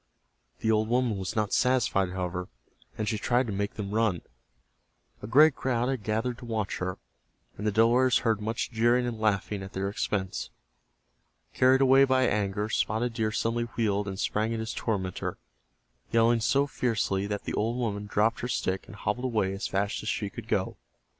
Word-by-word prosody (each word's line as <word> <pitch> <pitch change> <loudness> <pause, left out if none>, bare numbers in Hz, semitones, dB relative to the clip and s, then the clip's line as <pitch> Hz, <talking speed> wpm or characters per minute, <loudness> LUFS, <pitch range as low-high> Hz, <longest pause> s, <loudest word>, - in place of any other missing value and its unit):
The 110 - +2
old 110 0 +2
woman 120 -2 +1
was 95 +4 -4
not 105 -2 0
satisfied, 125 -7 +2
however, 90 0 -3 0.5
and 110 - -2
she 110 -1 -1
tried 125 +4 +2
to 110 - -4
make 100 +1 -2
them 100 -2 -5
run. 110 -5 +1 1.0
A 105 - -6
great 150 +6 +6
crowd 125 -1 0
had 130 -4 -2
gathered 110 +4 -2
to 125 - -10
watch 110 -4 -2
her, 90 0 -3 0.6
and 105 - -3
the - - +2
Delawares 120 +4 +4
heard 110 -2 +2
much 110 +3 -2
jeering 120 +2 +3
and 120 -2 -4
laughing 105 -1 0
at 95 0 -8
their 95 +1 -2
expense. 100 -2 -2 1.0
Carried 130 +1 +4
away 135 0 +6
by 130 -1 +3
anger, 105 -3 0
Spotted 110 +2 0
Deer 110 -1 0
suddenly 115 +2 0
wheeled 105 -3 +1
and 95 -1 -5
sprang 110 0 0
at - - -3
his 110 0 -4
tormentor, 95 -5 -3 0.7
yelling 115 0 +4
so 140 +5 +2
fiercely 105 -7 -1
that 105 0 -3
the - - -4
old 115 +3 0
woman 105 -4 -2
dropped 110 +3 +1
her 125 - -3
stick 95 -6 -2
and 105 - -11
hobbled 105 +5 -2
away 105 -6 0
as 95 - -3
fast 100 +1 -1
as 110 - -4
she 100 -3 -2
could - - -9
go. - - -1
110 Hz, 185 wpm, -28 LUFS, 100-120 Hz, 1.0 s, great